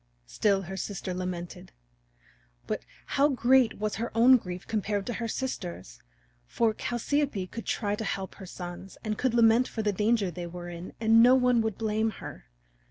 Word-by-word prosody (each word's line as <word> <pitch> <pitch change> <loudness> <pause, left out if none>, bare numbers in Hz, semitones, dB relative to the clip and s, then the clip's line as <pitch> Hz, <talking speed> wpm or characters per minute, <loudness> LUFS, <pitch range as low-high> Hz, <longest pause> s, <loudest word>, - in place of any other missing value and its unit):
Still 195 - +1
her 190 +2 -6
sister 190 -2 -4
lamented. 180 - -6 0.9
But - - -3 0.2
how 280 +1 +3
great 255 -3 +3
was 210 -1 -2
her 230 +2 -2
own 250 +3 +8
grief 180 -4 -7
compared 205 -2 -1
to 240 - -3
her 230 - -1
sister's! 180 - -5 0.5
For 225 - +1
Chalciope 240 -2 -1
could 230 +5 -8
try 205 -2 -1
to 220 - -5
help 195 -2 -3
her 190 - -8
sons 175 +1 -8
and 215 -2 -1
could 250 +1 0
lament 230 +1 +5
for 220 - -4
the 210 -1 +1
danger 210 -1 +1
they 175 +1 -6
were 175 0 -7
in 175 +1 -8
and 225 0 +5
no 250 +2 +7
one 250 -2 +3
would 220 -3 -2
blame 220 0 0
her. - - -9
215 Hz, 175 wpm, -28 LUFS, 185-235 Hz, 0.9 s, own